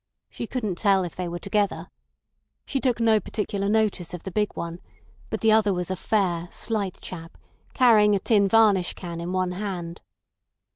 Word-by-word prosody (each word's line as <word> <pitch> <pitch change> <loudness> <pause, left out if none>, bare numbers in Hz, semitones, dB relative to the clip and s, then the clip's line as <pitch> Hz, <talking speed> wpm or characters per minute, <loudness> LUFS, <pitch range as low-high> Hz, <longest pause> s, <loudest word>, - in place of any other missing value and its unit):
"She 235 - -6
couldn't 215 -8 -3
tell 195 -3 +3
if 175 - -6
they 180 -1 -3
were 170 0 -4
together. 200 +3 -1 0.7
She 275 - -2
took 250 -3 +1
no 225 -2 +4
particular 200 -1 -3
notice 210 -5 0
of 175 - -10
the 190 - -6
big 210 +2 0
one, 170 +1 -5 0.5
but - - -4
the 225 - +4
other 215 -2 +4
was 180 +1 -3
a - - 0
fair, 180 -4 0
slight 205 -4 -2
chap, 165 -2 -8 0.4
carrying 215 -5 +5
a - - +1
tin 200 -1 +3
varnish 200 -4 +3
can 170 -2 -6
in 175 +1 -4
one 185 -1 0
hand." 180 -3 -5
195 Hz, 180 wpm, -25 LUFS, 180-215 Hz, 0.7 s, carrying